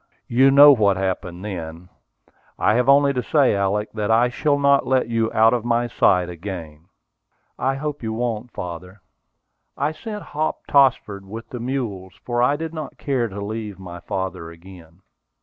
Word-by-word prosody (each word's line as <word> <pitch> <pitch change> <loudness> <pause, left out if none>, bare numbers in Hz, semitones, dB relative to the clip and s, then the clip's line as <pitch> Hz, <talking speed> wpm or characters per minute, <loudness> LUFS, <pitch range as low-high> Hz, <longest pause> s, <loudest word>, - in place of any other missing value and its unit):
You 130 +3 +4
know 145 +2 +9
what 105 -7 +3
happened 95 -1 -4
then. 85 -3 -7 0.7
I 105 - +2
have 125 +3 +1
only 140 0 +5
to 125 - -1
say, 140 -5 +2
Alick, 100 +2 -1
that 105 -1 -3
I 115 +2 +4
shall 145 +3 0
not 140 -1 +3
let 130 -1 +2
you 115 -1 0
out 110 +1 +4
of 120 -3 -1
my 120 0 +1
sight 90 -6 +2
again." 85 -3 -8 0.7
"I 135 +1 0
hope 145 +1 -5
you 110 -1 -3
won't, 115 0 -3
father." 90 0 -8 0.8
I 145 - 0
sent 210 +6 -7
Hop 155 +1 -3
Tossford 120 -8 +2
with 115 +3 -9
the 125 - -7
mules, 115 -7 -4
for 120 -1 -1
I 125 +4 +3
did 160 +1 -5
not 155 -3 -7
care 130 -5 -1
to 100 -1 -7
leave 105 -2 -5
my 90 -2 -9
father 90 -2 -5
again. 85 +1 -15
110 Hz, 170 wpm, -21 LUFS, 95-135 Hz, 0.8 s, know